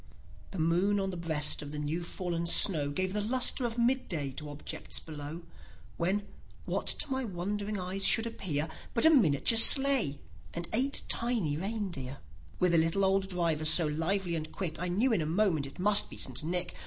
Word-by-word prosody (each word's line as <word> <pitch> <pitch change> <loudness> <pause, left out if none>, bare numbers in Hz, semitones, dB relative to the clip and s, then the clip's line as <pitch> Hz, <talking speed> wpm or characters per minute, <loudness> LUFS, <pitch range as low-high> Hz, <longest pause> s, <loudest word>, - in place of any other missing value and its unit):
he 195 - -8
moon 175 +5 +1
on 195 0 -2
the - - -7
breast 160 -3 -1
of 145 -1 -8
the 150 - -6
new 150 +3 -3
fallen 170 -1 -4
snow 155 -5 +4
Gave 185 +6 -3
the 210 - -1
lustre 250 +3 +1
of 230 0 -8
mid 255 +2 0
day 145 -6 -4
to 150 +3 -8
objects 145 0 -6
below, 155 +2 -9 0.5
When, 195 +4 -1 0.4
what - - -3
to 290 - -1
my 265 0 -1
wondering 205 +1 -4
eyes 185 +2 -2
should 225 +3 +5
appear, 165 -9 -4 0.3
But 235 - +1
a 320 - +7
miniature 225 - +4
sleigh, 265 - +7 0.4
and 170 0 -4
eight 265 +5 0
tiny 230 -11 -1
reindeer, 175 - -5 0.4
ith 180 -1 +2
a - - +4
little 165 +5 +1
old 190 0 0
driver, 170 -4 -1
so 160 +2 +3
lively 170 +4 -2
and 155 -1 -5
quick, 170 -4 -5
I 180 - -2
knew 220 +8 +1
in 185 - +1
a 155 - -3
moment 165 -5 0
it 135 - -14
must 205 +2 +3
be - - -10
St. 130 +2 -3
Nick. 180 +2 -3
180 Hz, 190 wpm, -30 LUFS, 155-210 Hz, 0.5 s, a